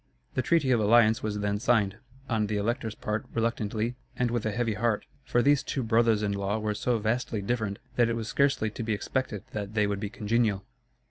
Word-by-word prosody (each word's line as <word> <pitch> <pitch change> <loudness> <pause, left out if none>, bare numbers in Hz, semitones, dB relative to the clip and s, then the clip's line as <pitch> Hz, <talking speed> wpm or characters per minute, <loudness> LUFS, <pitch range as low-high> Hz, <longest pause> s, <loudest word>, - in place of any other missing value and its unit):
The 130 - +1
treaty 145 -3 +2
of 120 - +4
alliance 110 +1 +5
was 105 -1 -2
then 105 0 0
signed, 105 -4 +2 0.3
on 110 -3 +1
the 105 0 -1
Elector's 110 +1 -1
part 105 +1 -3
reluctantly 115 0 -1 0.2
and 125 -1 +1
with 120 -2 -1
a - - 0
heavy 115 +1 0
heart; 110 0 0 0.2
for 120 -2 +2
these 145 -1 +4
two 135 - -3
brothers 115 -1 +3
in 105 - 0
law 100 +1 -1
were 110 -1 -1
so 120 +3 0
vastly 110 +1 -1
different, 100 -1 -2 0.2
that 120 -1 +4
it 115 - 0
was 115 -2 -4
scarcely 135 -4 +1
to 115 - -6
be 110 -1 -1
expected 105 -1 -2
that 105 0 -5
they 105 -1 +3
would 100 -1 -1
be 105 -1 -3
congenial. 110 -3 0
110 Hz, 210 wpm, -28 LUFS, 105-120 Hz, 0.3 s, alliance